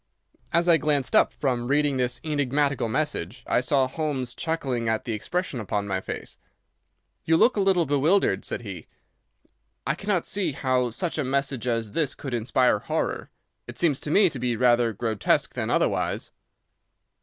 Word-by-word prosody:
As 170 +1 +2
I 170 -2 +6
glanced 145 -3 0
up - - +5
from 125 -4 -2
reading 145 0 +2
this 125 -1 0
enigmatical 145 -4 0
message, 110 - -2
I - - +2
saw 135 +1 +2
Holmes 130 -3 -3
chuckling 135 -8 -2
at 110 0 -1
the 115 - -2
expression 160 - -3
upon 100 -1 -2
my 95 -1 -1
face. - - -7 0.8
"You 160 0 +3
look 245 - +4
a - - 0
little 190 -3 +3
bewildered," 145 - +2
said - - -4
he. 95 -7 -8 1.0
"I 140 - +1
cannot 195 +1 -1
see 190 -7 0
how 130 -2 0
such 160 +8 -2
a - - +1
message 135 -1 -1
as 115 -3 -1
this 150 -1 -1
could 135 -3 -6
inspire 120 -1 +2
horror. - - -3 0.4
It - - -9
seems 150 -6 +2
to - - -5
me 195 +5 +5
to 135 - -6
be 120 -1 0
rather 120 0 +3
grotesque 110 0 0
than - - -3
otherwise." - - 0
135 Hz, 165 wpm, -25 LUFS, 120-155 Hz, 1.0 s, I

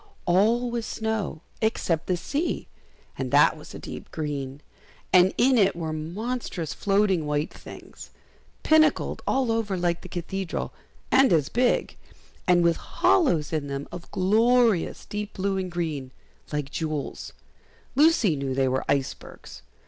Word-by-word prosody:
All 225 +7 +3
was 235 -1 -3
snow 220 -7 -3 0.2
except 180 -7 0
the 180 - +1
sea, 295 - -2 0.5
and - - -2
that - - +5
was - - -12
a - - -5
deep - - -8
green, 145 -3 -4 0.5
and 185 0 +6
in 255 -1 +4
it 195 -3 +3
were 160 -2 -3
monstrous 175 - -4
floating 195 -5 +1
white 150 +1 -1
things, - - -11 0.5
pinnacled 310 0 +3
all 265 -3 +1
over 220 -4 -1
like 175 -1 0
the - - -11
Cathedral, 185 +1 -4 0.4
and 265 -3 +5
as 155 -5 +3
big, 245 +1 +1 0.5
and 175 -1 +5
with 170 -1 +3
hollows 170 - +2
in 150 -2 -1
them 140 0 -4
of 175 0 -9
glorious 225 +1 +2
deep 210 0 -5
blue 195 0 -1
and 185 -1 -3
green, 155 -6 -3 0.4
like 145 -2 -3
jewels; 155 -3 -4 0.6
Lucy 275 - +4
knew 135 -2 -3
they 135 0 +2
were 130 +1 0
icebergs. 140 -1 -3
180 Hz, 140 wpm, -26 LUFS, 155-225 Hz, 0.6 s, and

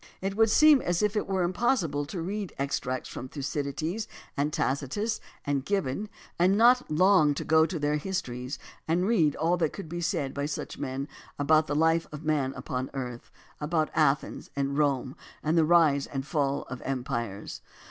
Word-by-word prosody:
It 195 +1 -3
would 225 +1 +4
seem 300 +3 +6
as 175 +2 0
if 210 0 +1
it 210 - 0
were 190 -2 0
impossible 175 - +1
to 165 +1 -4
read 200 +1 -4
extracts 130 -2 -2
from 130 - -7
Thucydides 150 +8 -3 0.3
and 145 +2 0
Tacitus 150 - -1 0.3
and 140 -2 0
Gibbon 195 +2 -1 0.3
and 185 +3 +4
not 245 +3 +5
long 155 -2 +4
to - - -3
go 160 0 +5
to 175 - -4
their 150 0 +1
histories 130 -7 -4 0.3
and 170 +3 +2
read 165 -11 +3
all 170 +3 +1
that 160 -3 0
could 195 - -7
be 175 +2 -5
said 145 -5 -1
by 140 0 -2
such 150 - -5
men 135 0 -3 0.3
about 155 +2 +3
the 145 - -1
life 160 +2 +3
of 150 +1 -8
man 145 -4 +1
upon 130 -1 -4
earth, 125 -3 -5 0.3
about 155 +1 0
Athens 150 -3 +1
and 140 0 -1
Rome 140 -3 +1 0.3
and 155 +2 +1
the 165 -2 +5
rise 155 -4 +4
and 135 -1 -4
fall 140 -3 0
of 130 0 -8
empires. 120 -6 -4
155 Hz, 180 wpm, -28 LUFS, 140-180 Hz, 0.3 s, seem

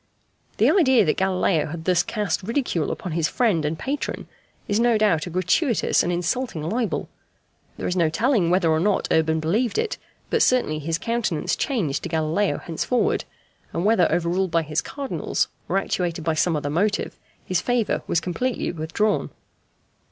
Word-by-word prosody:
The - - +4
idea 260 - +4
that 155 - +2
Galileo 185 -3 +1
had 160 +1 -7
thus 180 -2 +3
cast 210 -2 -2
ridicule 225 - -1
upon 180 - -4
his 160 -1 +1
friend 205 -9 +1
and 150 +2 -1
patron 280 - -4 0.4
is 205 +1 +1
no 235 -1 +4
doubt 190 -7 +2
a - - -4
gratuitous 185 - +2
and 175 - -1
insulting 175 -1 -2
libel: 225 +2 -1 0.7
there - - -3
is 180 - -1
no 170 -3 +3
telling 215 - +2
whether 175 -2 +3
or 155 - +2
not 200 +3 +1
Urban 160 0 +2
believed 215 - 0
it, 450 -1 -1 0.3
but 460 - +2
certainly 240 -12 +2
his 160 +2 -1
countenance 230 -7 -1
changed 185 - -1
to 175 - -5
Galileo 160 +5 0
henceforward, 175 +9 -1 0.5
and 170 - -1
whether 205 -5 +4
overruled 175 +2 +1
by 165 0 +1
his 155 +1 -1
Cardinals, 275 -2 -2 0.2
or - - +1
actuated 175 -4 -1
by 165 0 +1
some 165 +1 +1
other 145 -1 -2
motive, 200 +7 0 0.3
his 185 -2 0
favour 245 -3 0
was 170 - +2
completely 235 +10 -2
withdrawn. 175 +6 -1
180 Hz, 165 wpm, -23 LUFS, 160-230 Hz, 0.7 s, The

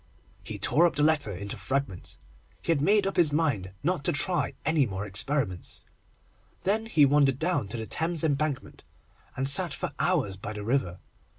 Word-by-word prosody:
He - - -6
tore 170 +3 +4
the 150 -2 -1
letter 150 -8 +2
up 90 - -6
into 100 +1 -5
fragments. 135 -9 -3 0.5
He - - +1
had 150 -4 +1
made 205 +5 +4
up 195 - -2
his 165 -4 +5
mind 145 - 0
not 170 -2 0
to - - +3
try 155 0 +1
any 155 -3 +2
more 95 0 -4
experiments. 100 - -2 0.8
Then 220 +3 0
he 155 -10 +5
wandered 140 -2 +3
down 160 - 0
to 100 - -5
the 110 - -4
Thames 165 +5 -1
Embankment, 145 -2 -2 0.5
and 130 +1 -1
sat 140 - +2
for - - -4
hours 95 -2 +1
by 105 +3 -6
the 105 -1 -6
river. 105 -7 0
140 Hz, 180 wpm, -27 LUFS, 110-160 Hz, 0.8 s, his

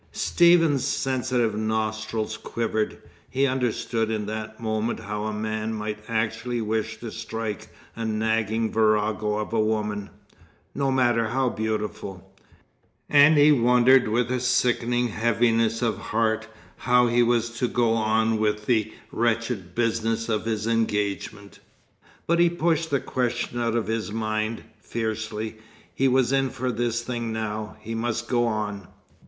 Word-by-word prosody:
Stephen's 165 -6 +4
sensitive 125 -4 0
nostrils 110 0 -2
quivered. 110 -1 -2 0.3
He 135 +2 +1
understood 120 -3 -1
in 110 -2 -2
that 110 +1 -6
moment 110 +1 -2
how 105 +1 -4
a 110 - -1
man 110 +1 -3
might 105 0 -4
actually 115 +2 -1
wish 110 0 -2
to 115 -2 -6
strike 115 -2 -5 0.3
a 115 - -4
nagging 110 0 0
virago 110 -1 +1
of 105 +1 -4
a 115 - +2
woman, 105 -2 -1 0.6
no 140 -1 0
matter 120 -3 +2
how 130 +3 +1
beautiful. 105 -4 -4 0.8
And 145 +1 +7
he 145 +1 +7
wondered 125 -1 +5
with 120 +3 0
a 125 - 0
sickening 120 -1 +1
heaviness 115 +1 +1
of 110 -4 0
heart 110 0 0 0.3
how 125 +1 +3
he 120 0 +3
was 120 -1 +2
to 125 - +2
go 120 -2 +2
on 110 0 +1
with 105 0 0
the 110 -3 +1 0.2
wretched 115 -6 -1
business 115 -1 0
of 110 -1 0
his 110 -1 -1
engagement. 105 -2 -2 0.7
But 170 +1 +2
he 175 0 +5
pushed 165 -1 0
the 140 - +1
question 120 -1 -2
out 115 -1 0
of 115 - 0
his 110 -1 -2
mind, 110 0 -2 0.2
fiercely. 110 -1 -4 0.4
He 135 - +2
was 130 -1 +3
in 135 -1 +2
for 125 +1 -2
this 120 0 -1
thing 120 -2 -3
now. 110 -1 -4
He 115 - -6
must 120 +1 -2
go 120 -1 +2
on. 105 -3 -3
115 Hz, 145 wpm, -25 LUFS, 110-120 Hz, 0.8 s, And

